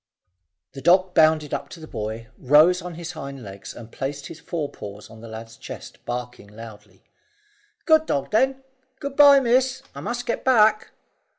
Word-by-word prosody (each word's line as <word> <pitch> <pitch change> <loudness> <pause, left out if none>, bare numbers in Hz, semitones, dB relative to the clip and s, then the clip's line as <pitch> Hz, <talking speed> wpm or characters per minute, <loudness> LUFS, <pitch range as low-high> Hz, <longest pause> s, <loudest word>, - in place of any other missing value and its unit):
The 135 - -9
dog 180 +4 +4
bounded 155 -2 +3
up 140 - -4
to 170 - -11
the 160 - -9
boy, 110 -3 -5
rose 155 +7 +5
on 180 -1 -7
his 170 0 -6
hind 140 -5 -8
legs 100 -1 -10
and 115 -1 -11
placed 140 +1 -5
his 160 - -9
forepaws 105 - -6
on 110 0 -13
the 115 - -10
lad's 115 0 -9
chest, - - -10
barking 120 -3 -6
loudly. 105 -2 -13 0.8
"Good 315 -1 +4
dog, 140 - -2
then. 265 +4 +1 0.4
Good 280 -1 -5
bye, 285 -1 +8
miss; 255 +1 +1
I - - -8
must 245 +1 -4
get - - -2
back." 215 -4 +4
150 Hz, 170 wpm, -23 LUFS, -, 0.8 s, bye